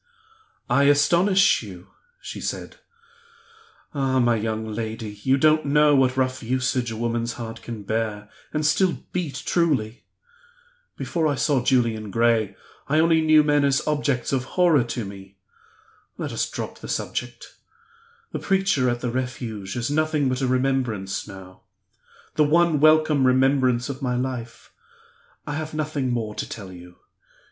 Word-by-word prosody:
"I 140 - +3
astonish 170 +7 +4
you?" 95 -4 -11 0.3
she - - -8
said. - - -5 1.2
"Ah, 135 -2 0
my 120 -1 +3
young 110 0 -2
lady, 110 0 -5
you 130 +3 +2
don't 155 +2 +4
know 150 +1 +4
what 130 -1 +2
rough 130 0 0
usage 125 0 -1
a 115 - -5
woman's 115 0 -2
heart 115 -2 -7
can 115 -3 -7
bear, 105 0 -2 0.2
and 150 0 -1
still 175 +4 +1
beat 150 -7 -3
truly! 135 -10 0 0.9
Before 165 -2 -1
I 145 - 0
saw 135 -2 +1
Julian 115 -5 +1
Gray 115 0 +1 0.3
I 150 - +2
only 160 0 +4
knew 155 -1 +5
men 145 -1 +2
as 140 -1 +1
objects 145 -4 0
of 130 -1 0
horror 170 -7 +5
to 120 -2 -4
me. 95 0 -11 0.8
Let - - -4
us - - -2
drop - - -6
the - - -9
subject. - - -5 0.8
The - - -4
preacher 190 -10 +1
at 120 0 -2
the 120 - -2
Refuge 120 -6 -4
is 120 +2 -2
nothing 155 -2 +1
but 130 +1 -2
a 130 - +1
remembrance 125 -8 -1
now 95 -2 -12 0.7
the 155 - +3
one 165 +1 +3
welcome 155 -2 +4
remembrance 130 -2 +2
of 140 0 -6
my 125 -2 -1
life! 125 -2 -5 0.7
I 150 - -4
have 155 +1 -5
nothing 150 -4 -2
more 115 -3 -2
to - - -5
tell 100 -5 -8
you. 90 0 -13
130 Hz, 150 wpm, -23 LUFS, 115-150 Hz, 1.2 s, knew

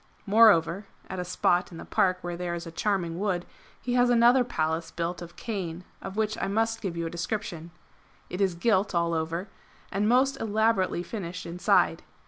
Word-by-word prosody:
Moreover 200 -3 +5 0.2
[at 190 - -4
a - - -1
spot 180 0 +1
in 165 - -9
the - - -8
Park 185 -1 +2
where 175 0 -3
there 175 0 -3
is 170 - -6
a 165 - -8
charming 175 -2 -1
wood] 185 -4 -1 0.3
he 245 - -3
has 245 0 +4
another 240 +2 +5
Palace 165 -7 -2
built 170 +1 -3
of 175 0 -9
cane, 185 -6 -5 0.2
of 195 - -7
which 215 0 0
I - - 0
must 225 +3 0
give 180 -5 -4
you 170 - -2
a - - -2
description. 170 -1 -4 0.6
It 180 +3 -5
is 190 -3 +2
gilt 190 0 +1
all 170 0 +1
over, 165 +4 -2 0.4
and 205 +2 +1
most 260 +3 +3
elaborately 215 -4 +1
finished 180 -3 -6
inside. 175 +2 +2
185 Hz, 185 wpm, -27 LUFS, 170-215 Hz, 0.6 s, Moreover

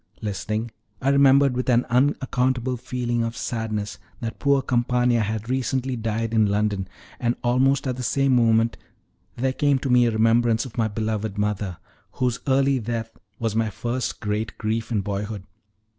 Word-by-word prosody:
Listening, 110 +3 -3 0.3
I 135 - +1
remembered 140 -1 +5
with 125 +1 -1
an 120 0 +3
unaccountable 130 -1 +1
feeling 120 -1 -2
of 115 0 -4
sadness, 110 -3 -3 0.2
that 115 -1 -5
poor 140 -2 +3
Campana 120 -1 +2
had 110 +1 -2
recently 130 0 -1
died 115 0 -2
in 110 -2 +4
London; 100 -2 0 0.3
and 120 0 0
almost 135 +3 +2
at 130 -2 -2
the - - -4
same 135 +2 +2
moment 115 -1 +3 0.6
there 130 +2 0
came 145 0 +2
to 130 0 -2
me 125 -1 +5
a - - +1
remembrance 115 +1 +3
of 125 - -10
my 115 -2 +1
beloved 110 -1 -3
mother, 105 -3 -1 0.4
whose 125 -1 -1
early 135 0 +3
death 115 0 -4 0.2
was 115 -2 -2
my 110 -1 +1
first 120 +5 -3
great 105 0 -2
grief 110 +1 -2
in 105 -3 +1
boyhood. 100 +1 -4
120 Hz, 160 wpm, -24 LUFS, 110-130 Hz, 0.6 s, remembered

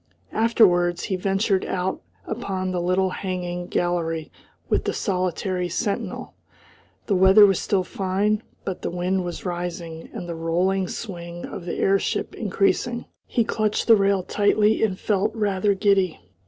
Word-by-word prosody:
Afterwards 175 -6 +3
he 190 - -1
ventured 195 +1 +1
out 185 0 -2 0.2
upon 190 -5 -3
the 180 -1 -1
little 185 +1 +1
hanging 180 -2 -4
gallery 165 -3 -1 0.4
with - - +1
the - - 0
solitary 185 -2 -1
sentinel. 200 +4 -3 0.7
The 205 - 0
weather 190 +3 +8
was 195 -3 +3
still 195 -2 +1
fine, 200 +3 0 0.2
but 190 - -4
the - - -2
wind 180 +2 -1
was 175 +1 -6
rising 175 -2 -5
and 175 - -6
the 170 - -4
rolling 180 +4 0
swing 175 -5 -6
of 175 - -7
the 175 - -3
airship 195 0 +1
increasing. 230 +3 0 0.2
He 235 - +1
clutched 215 -1 0
the 230 - +7
rail 195 -2 +2
tightly 210 +3 +2
and 195 -4 +1
felt 210 +1 0
rather 205 -2 +1
giddy. 195 -3 +2
190 Hz, 145 wpm, -24 LUFS, 175-205 Hz, 0.7 s, weather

